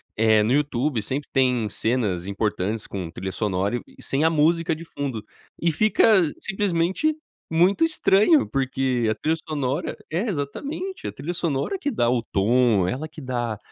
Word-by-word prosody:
eh, 110 -1 +4
no 120 +4 +1
YouTube 140 -4 0
sempre 135 +7 -4
tem 125 -5 +2
cenas 105 -5 -1
importantes 105 +1 -2
com 90 -4 -5
trilha 95 +3 -5
sonora 100 +2 -1
e - - -13
e - - -12
sem 140 +3 0
a 160 - +5
música 165 +1 +2
de 165 +2 -10
fundo 130 -9 -5 0.3
e 170 -1 +2
fica 215 +7 +3 0.3
simplesmente 195 - 0 0.3
muito 180 - +3
estranho 295 - +4
porque 130 -3 0
a 110 - 0
trilha 160 +6 0
sonora 140 -2 -2
é 195 +8 -1
exatamente 280 - -4
a - - -3
trilha 160 +6 -5
sonora 165 - -1
que 290 - -1
dá 120 - +1
o 120 -1 +2
tom, 110 -2 +2
ela 140 +9 -3
que 155 - -12
dá, 120 -5 -3
135 Hz, 165 wpm, -24 LUFS, 110-165 Hz, 0.3 s, a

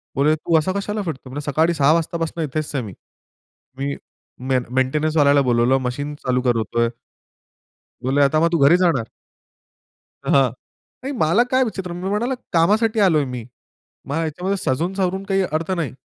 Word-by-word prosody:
बोलले, 150 +3 +3
"तू 160 +1 +1
असा 185 +4 -1
कशाला 205 +2 -3
फिरतो?" 145 -6 -6
म्हंटलो, 140 +3 -5
"सकाळी 160 +4 +2
6:00 145 -2 +3
वाजतापासून 165 0 -2
इथेच 155 +1 -3
आहे 130 - -1
मी, 100 -4 -8 0.8
मी 140 +1 -2 0.5
में 130 -1 +2
मेंटेनन्स 150 +5 0
वाल्याला 140 -1 +5
बोलावलं, 120 +2 +3
मशीन 145 +4 -3
चालू 125 0 +1
करतोय." 115 0 +1 1.1
बोलले, 135 +3 +2
"आता 140 +3 +3
मग 165 +1 +2
तू 170 - +2
घरी 175 +5 +6
जाणार?" 165 -11 +1 1.2
हां. 135 -3 +4 0.5
नाही 275 - -3
मला 195 +7 +3
काय 260 0 +4
विचित्र. 190 -6 -4
मी 180 +2 -4
म्हणालो, 235 +6 0 0.2
"कामासाठी 215 +6 +3
आलोय 165 -7 +4
मी." 125 -3 -6 0.7
मला 145 +4 -1
ह्याच्यामध्ये 180 +5 -2
सजून 165 +9 0
सावरून 190 0 -1
काही 195 -1 +1
अर्थ 160 -1 -2
नाही. 170 -9 -1
155 Hz, 160 wpm, -21 LUFS, 135-185 Hz, 1.2 s, घरी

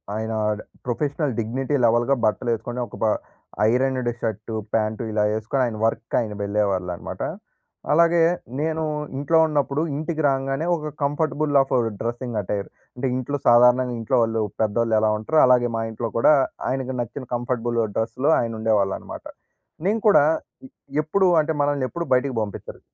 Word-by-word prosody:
ఆయన 110 +1 -3 0.5
professional 145 +3 -1
dignity 130 +6 -1
లెవెల్‌‌గా 120 +4 +3
బట్టలేసుకొని, 120 +2 -1
ఒక - - -11
బ - - +4 0.7
ఐరన్డ్ 130 0 +1
షర్టు, 110 0 -3 0.2
ప్యాంటు 110 +1 0
ఇలా 105 -1 +1
ఏసుకొని 110 +5 -1
ఆయన 110 - -5
వర్క్‌కి 115 0 -1
ఆయన 110 -3 -4
వెళ్ళేవాళ్ళనమాట. 95 -4 -2 0.7
అలాగే 170 +2 +4 0.4
నేను 160 0 -1 0.3
ఇంట్లో 145 +4 +2
ఉన్నప్పుడు, 145 -1 0 0.2
ఇంటికి 155 +1 -3
రాంగానే 135 +3 -1
ఒక 155 -2 -5
కంఫర్టబుల్ 145 0 0
ఆఫ్ 135 - -2 0.3
డ్రెస్సింగ్ 120 -1 -3
అటైర్. 100 +1 -3 0.3
అంటే 130 +2 -2
ఇంట్లో 135 +3 -2
సాధారణంగా 125 +1 +5
ఇంట్లో 120 +3 0
వాళ్ళు 115 0 0 0.2
పెద్దోళ్ళు 110 +1 +1
ఎలా 110 0 +2
ఉంటారో 155 +9 +1
అలాగే 125 -1 +4
మా 115 - -1
ఇంట్లో 115 +1 -4
కూడా 115 - +6 0.4
ఆయనకి 130 -1 -2
నచ్చిన 130 +3 -6
కంఫర్టబుల్ 120 -1 -1 0.2
డ్రెస్‌లో 125 +6 0
ఆయన 115 -2 -3
ఉండేవాళ్ళనమాట. 105 -3 -1 0.6
నేను 210 +4 +2
కూడా 205 -8 +7 0.8
ఎప్పుడూ 190 +5 +2
అంటే 155 +1 -2
మనల్ని 145 -2 +1
ఎప్పుడు 170 0 -4
బయటికి 130 +1 +1
పంపించరు. 105 -2 -6
125 Hz, 140 wpm, -23 LUFS, 110-145 Hz, 0.8 s, కూడా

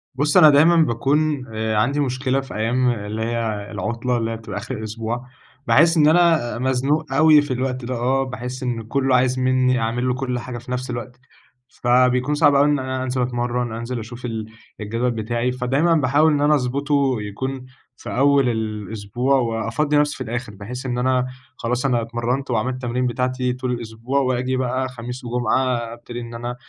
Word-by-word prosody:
بُص، 150 +5 +2
أنا 155 -4 +9
دايمًا 155 +4 +5
باكون 145 0 +1
آآ، 110 0 -1
عندي 135 +7 +1
مشكلة 130 0 0
في 135 - -10
أيام 125 +4 +1
اللي 110 -1 -3
هي 110 -3 -2
العطلة، 120 +4 -2
اللي 115 0 -2
هي 115 - -4
بتبقى 105 -3 -7
آخر 125 +4 -5
الأسبوع. 115 +3 -4 0.4
باحس 165 +3 +5
إن 150 -1 +5
أنا 160 -8 +3
مزنوق 135 +3 0
أوي 155 0 +6
في 145 -3 -3
الوقت 130 -1 -2
ده 130 0 -3
آه، 130 +3 +1
باحس 125 0 -6
إن 120 -2 -2
كله 130 +3 +1
عايز 125 +1 +2
مني 130 0 +2
أعمل 120 +3 -1
له 125 - +2
كل 125 -1 -2
حاجة 120 0 -6
في 125 +2 -10
نفس 125 0 -3
الوقت، 120 0 -6 0.5
فبيكون 125 +3 +2
صعب 145 -2 +4
أوي 140 +1 +5
إن 145 -1 +2
أنا 130 0 -3
أنزل 130 0 -1
أتمرن، 120 -1 -1
أنزل 120 +1 -4
أشوف 120 +3 -8
ال 110 -2 -4 0.4
الجدول 115 +4 -1
بتاعي، 120 +2 -1
فدايمًا 135 +7 +1
باحاول 150 +2 +3
إن 145 - +1
أنا 150 +1 +4
أضبطه 140 0 +1
يكون 130 +6 -5 0.3
في - - -9
أول 140 -1 +4
الأسبوع، 110 +3 -2
وأفضّي 120 +5 0
نفسي 145 0 +1
في 130 - -4
الآخر، 120 -1 -5
بحيث 125 +6 -7
إن 120 -1 -2
أنا 130 0 +1 0.3
خلاص، 125 +3 -2
أنا 120 -3 +2
اتمرنت 120 +3 -2
وعملت 120 +3 0
التمارين 125 0 -2
بتاعتي 125 0 -1
طول 125 0 -3
الأسبوع، 120 +3 -2
وآجي 130 -1 0
بقى 130 0 -1
خميس 125 +1 -7
وجمعة 125 +1 0 0.2
أبتدي 120 0 -8
إن 115 0 -8
أنا 120 +1 -5
125 Hz, 180 wpm, -21 LUFS, 120-135 Hz, 0.5 s, أنا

